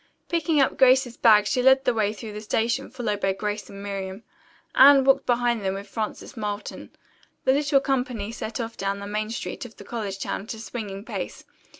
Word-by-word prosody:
Picking 325 -3 +1
up 270 - +2
Grace's 260 -2 +5
bag 210 -2 +5
she 230 +5 +1
led 265 +1 +5
the 250 - +3
way 215 -2 +1
through 215 0 -8
the 210 - -6
station 225 +2 -1
followed 230 -5 -3
by 195 - +1
Grace 210 +2 -4
and 200 0 -9
Miriam. 195 +1 -5 0.5
Anne 275 0 +8
walked 270 +1 +3
behind 240 -2 +1
them 190 0 -1
with 200 +1 -7
Frances 215 +5 -5
Marlton. 210 -2 -5 0.5
The 260 - +4
little 280 0 +3
company 250 -6 -1
set 225 0 -5
off 230 -1 -4
down 195 0 -2
the 200 - -7
main 215 +1 -2
street 230 - -5
of 245 -2 -10
the - - -10
college 210 -5 -4
town - - -3
at 220 +3 -7
a - - -11
swinging 210 -3 -6
pace. - - -5
225 Hz, 205 wpm, -25 LUFS, 205-255 Hz, 0.5 s, Anne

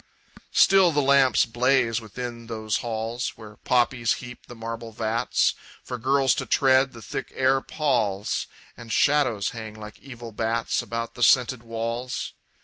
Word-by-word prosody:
Still 195 -3 +6
the 150 - +1
lamps 135 -2 +4
blaze 120 -1 +1
within 115 +1 -7
those 110 -2 -2
halls, 115 +1 -3
Where 105 -2 -13
poppies 120 -1 +1
heap 125 -1 -10
the 120 - -10
marble 115 0 -6
vats 115 +2 0 0.3
For 125 - -6
girls 135 +2 +3
to - - -7
tread; 130 0 +3
the 115 -1 -11
thick - - -5
air 135 0 +2
palls; 110 -12 -1 0.3
And 115 -1 -10
shadows 120 -6 +2
hang 110 -2 -8
like 105 -1 -10
evil 120 -4 -10
bats 115 +1 -1
About 115 0 -5
the 120 - -10
scented 125 0 +4
walls. 115 +2 -4
120 Hz, 145 wpm, -25 LUFS, 115-130 Hz, 0.3 s, Still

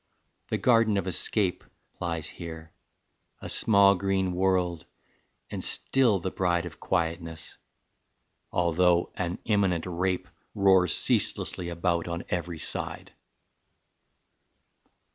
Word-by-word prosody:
The - - -1
garden 115 -4 +3
of 95 - -1
escape 95 +1 0 0.4
Lies 85 -3 -3
here; 80 -2 -9 0.7
a - - -7
small 100 -2 +5
green 95 -1 0
world, 90 -2 0 0.6
and - - -4
still 125 -7 +2
the 95 +1 -4
bride 85 -2 0
Of 85 - -9
quietness, 85 -2 -3 1.0
although 85 0 +2
an 90 -1 -3
imminent 95 -6 +1
rape 90 +1 -1 0.3
Roars 95 -4 +4
ceaselessly 85 -1 0
about 85 0 -1
on 85 0 -4
every 85 -1 -2
side." - - -4
90 Hz, 105 wpm, -27 LUFS, 85-95 Hz, 1.0 s, small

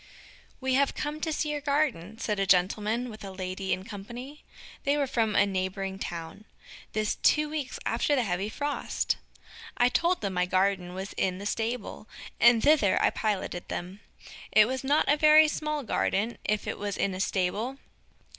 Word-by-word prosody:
We 260 -1 0
have 275 +1 +2
come 300 +1 -4
to 320 - -1
see 300 0 -1
your 295 -1 -3
garden, 280 - 0
said 210 -3 -2
a 195 - +1
gentleman 210 +6 +2
with 215 0 -11
a 195 - -6
lady 190 0 -4
in 185 - -1
company. 240 +8 -9 0.4
They 285 +1 +2
were 285 - +2
from 230 -5 0
a 200 - +5
neighboring 190 0 -3
town. 170 +3 -6 0.5
This 215 0 0
two 300 0 +4
weeks 295 -4 -4
after 290 - +1
the 255 - +2
heavy 195 0 -2
frost! 290 +5 -2 0.6
I 245 0 +4
told 345 +8 +1
them 200 -2 -2
my 180 0 +1
garden 185 -1 +1
was 190 +1 -5
in 185 -1 0
the 200 - -7
stable, 225 0 -3 0.3
and 235 -1 +6
thither 285 -10 +4
I - - +3
piloted 195 -4 -2
them. 180 +3 -5 0.5
It 215 0 +6
was 260 +1 -3
not 285 +3 +2
a 290 - +5
very 310 +1 +7
small 300 -1 -2
garden 220 0 0
if 210 0 0
it - - -4
was 205 -1 -3
in 195 - 0
a 185 - -5
stable. 205 +7 -1
215 Hz, 180 wpm, -28 LUFS, 195-280 Hz, 0.6 s, very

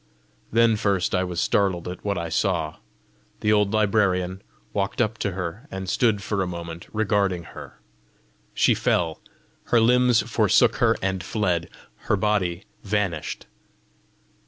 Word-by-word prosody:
Then 115 -1 +4
first 100 -3 0
I 90 -1 +2
was 90 -2 -3
startled 95 -2 +1
at 90 0 -7
what 100 -2 -1
I 85 -1 -3
saw: - - -1 0.6
the 105 0 +3
old 105 -1 +2
librarian 95 -4 +1 0.3
walked 100 -1 -2
up 115 -1 0
to 100 - -1
her, 90 - -5
and 95 0 -6
stood 105 0 +1
for 100 0 -1
a 95 - -1
moment 85 -1 -7
regarding 100 -4 0
her; - - -11 0.8
she - - +4
fell; 80 -2 0 0.4
her 120 - +3
limbs 125 +1 +4
forsook - - +3
her - - +3
and 95 -2 -1
fled; 90 -6 -1 0.4
her - - +3
body 95 -3 0 0.2
vanished. 100 -6 -2
95 Hz, 140 wpm, -24 LUFS, 90-105 Hz, 0.8 s, Then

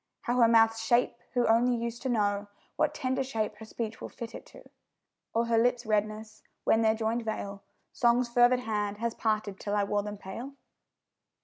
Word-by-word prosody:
How 245 +1 -1
her 235 - +7
mouth's 225 0 +4
shape, 240 +1 +3 0.2
who 245 - +3
only 240 +2 +4
use 235 0 -4
to 260 - -3
know 205 -3 0 0.3
What 305 -1 +1
tender 260 0 -1
shape 220 -5 -3
her 220 - -10
speech 225 0 -5
will - - -6
fit 230 -1 -8
it - - -9
to? - - -15 0.6
Or 230 +1 +1
her 230 -1 +2
lips' 245 +1 +1
redness, 215 0 -2 0.2
when 225 - +3
their 220 0 +3
joinèd 225 +1 -1
veil 200 -2 -4 0.3
Song's 240 +1 +3
fervid 245 +1 +4
hand 210 -3 -2
has 230 +1 -2
parted 215 -4 -1
till 205 0 -2
it 200 -1 +1
wore 205 0 +1
them 210 0 -6
pale? 235 +9 -8
225 Hz, 190 wpm, -29 LUFS, 215-240 Hz, 0.6 s, her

